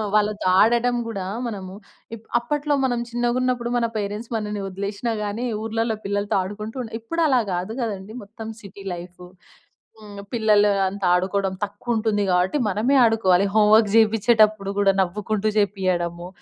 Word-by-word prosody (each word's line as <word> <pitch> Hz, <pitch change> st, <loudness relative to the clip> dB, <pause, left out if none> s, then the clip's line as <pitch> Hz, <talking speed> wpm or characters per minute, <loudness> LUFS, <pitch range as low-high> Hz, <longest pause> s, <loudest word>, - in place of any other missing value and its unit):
వాళ్ళతో 210 Hz, 0 st, +1 dB
ఆడడం 240 Hz, +2 st, +3 dB
గూడా, 200 Hz, -5 st, -4 dB, 0.2 s
మనము 190 Hz, -4 st, -6 dB, 0.4 s
ఇప్ 225 Hz, 0 st, -16 dB
అప్పట్లో 290 Hz, +4 st, -1 dB
మనం 245 Hz, -2 st, 0 dB
చిన్నగున్నప్పుడు, 240 Hz, 0 st, 0 dB
మన 235 Hz, -, +1 dB
పేరెంట్స్ 210 Hz, +3 st, -4 dB
మనని 210 Hz, -1 st, -4 dB
ఒదిలేషినా 200 Hz, +4 st, -3 dB
గానీ, 210 Hz, +4 st, -3 dB, 0.2 s
ఊర్లల్లో 225 Hz, 0 st, -1 dB
పిల్లలతో 205 Hz, 0 st, 0 dB
ఆడుకుంటూ 210 Hz, +5 st, -7 dB
ఉండె. 225 Hz, -, -10 dB
ఇప్పుడలా 285 Hz, 0 st, +1 dB
గాదు 180 Hz, +5 st, -3 dB
గదండీ. 210 Hz, -1 st, -5 dB
మొత్తం 220 Hz, +2 st, -10 dB
సిటీ 200 Hz, 0 st, -12 dB
లైఫు. 180 Hz, +1 st, -10 dB, 0.7 s
హ్మ్. 205 Hz, -2 st, -11 dB
పిల్లలు 210 Hz, -3 st, +4 dB, 0.2 s
అంతా 195 Hz, 0 st, -4 dB
ఆడుకోడం 190 Hz, +1 st, 0 dB
తక్కువుంటుంది 215 Hz, 0 st, -1 dB
గాబట్టి, 180 Hz, +9 st, +2 dB
మనమే 220 Hz, +8 st, +1 dB
ఆడుకోవాలి. 200 Hz, -5 st, +3 dB
హోమ్ 210 Hz, -1 st, +4 dB
వర్క్ 220 Hz, -2 st, +4 dB
జెపిచ్చేటప్పుడు 215 Hz, -2 st, +3 dB
గూడా, 200 Hz, -1 st, +4 dB
నవ్వుకుంటూ 210 Hz, +3 st, -2 dB
జేపియ్యడము. 180 Hz, -4 st, 0 dB
210 Hz, 135 wpm, -23 LUFS, 195-230 Hz, 0.7 s, పిల్లలు